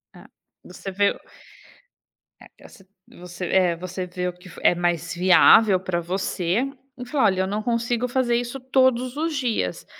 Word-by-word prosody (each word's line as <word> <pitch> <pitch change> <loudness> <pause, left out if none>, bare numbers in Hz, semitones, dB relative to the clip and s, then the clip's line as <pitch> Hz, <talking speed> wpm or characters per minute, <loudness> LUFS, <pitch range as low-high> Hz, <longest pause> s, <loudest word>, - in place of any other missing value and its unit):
É, - - -15 0.4
você 195 - -9
vê 200 +2 +2
o - - -2 1.3
é - - -19
assi 195 - -16 0.3
você 180 0 -7
eh, 180 -2 +2
você 185 +2 -6
vê 180 0 -4
o 180 - -4
que 180 +1 -17
f - - -12
é - - +5
mais 170 -1 -1
viável 185 +2 +5
pra 180 -2 -3
você 180 +3 -2 0.3
e 250 - -7
falar: 275 +1 0
"Olha, 190 -1 +2
eu 190 - -1
não 210 +2 -3
consigo 235 +1 -1
fazer 245 -1 0
isso 245 +2 -3
todos 260 0 +1
os 320 0 -2
dias", 230 - -2
195 Hz, 175 wpm, -23 LUFS, 180-245 Hz, 1.3 s, é